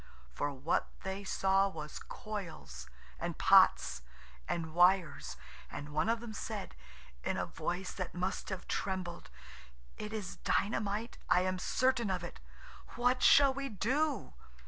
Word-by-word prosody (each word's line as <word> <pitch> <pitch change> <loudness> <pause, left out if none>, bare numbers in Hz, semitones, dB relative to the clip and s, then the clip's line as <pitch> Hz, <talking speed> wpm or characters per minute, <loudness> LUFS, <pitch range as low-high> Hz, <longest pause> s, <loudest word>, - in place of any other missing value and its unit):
For 145 - -1
what 140 +4 0 0.2
they 190 +1 -4
saw 195 0 +3
was 155 -5 -6
coils, 75 - -7 0.3
and - - -3
pots, - - +5 0.5
and 160 -2 -2
wires; 175 - +3 0.3
and 145 +1 -6
one 155 +8 +1
of 230 0 +1
them 235 -2 -7
said, 130 - -5 0.5
in - - -1
a - - 0
voice 180 +2 -3
that 185 -2 -5
must 180 +2 -2
have 190 -2 -5
trembled– 185 -3 -3 0.7
"It 210 - -5
is 215 -4 -5
dynamite, 210 +1 -1
I 180 - +5
am 185 0 0
certain 245 +2 +2
of 180 -2 -1
it; 175 - -7 0.6
what 245 +1 +2
shall 275 -2 +7
we 275 0 -3
do?" 260 - 0
190 Hz, 140 wpm, -33 LUFS, 170-220 Hz, 0.7 s, shall